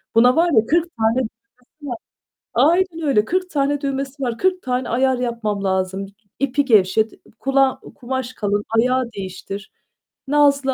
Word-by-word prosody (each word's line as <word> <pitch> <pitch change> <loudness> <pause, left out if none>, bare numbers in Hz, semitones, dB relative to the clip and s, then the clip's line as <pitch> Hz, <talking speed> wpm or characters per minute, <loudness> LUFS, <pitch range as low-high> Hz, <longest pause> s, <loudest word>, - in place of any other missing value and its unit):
Buna 245 +2 +6
var 340 +1 +3
ya, 220 -1 +4
40 340 +1 +2
tane 225 +1 +2
düğmesi 230 -1 -3 0.5
var. 240 - -3 0.6
Aynen 335 +1 +2
öyle, 215 -6 +3
40 365 +6 -1
tane 285 -1 0
düğmesi 275 0 -3
var. 240 -3 -2
40 370 0 +1
tane 250 0 -2
ayar 260 +1 +2
yapmam 225 -5 -2
lazım. 190 +1 -1 0.3
İpi 275 +1 +1
gevşet, 220 -2 +3
ı - - -18 0.2
kula 270 -1 +2
kumaş 255 0 -4
kalın, 205 -2 -1
ayağı 250 0 +2
değiştir. 195 0 -7 0.6
Nazlı 280 -2 +3
255 Hz, 150 wpm, -20 LUFS, 220-280 Hz, 0.6 s, Buna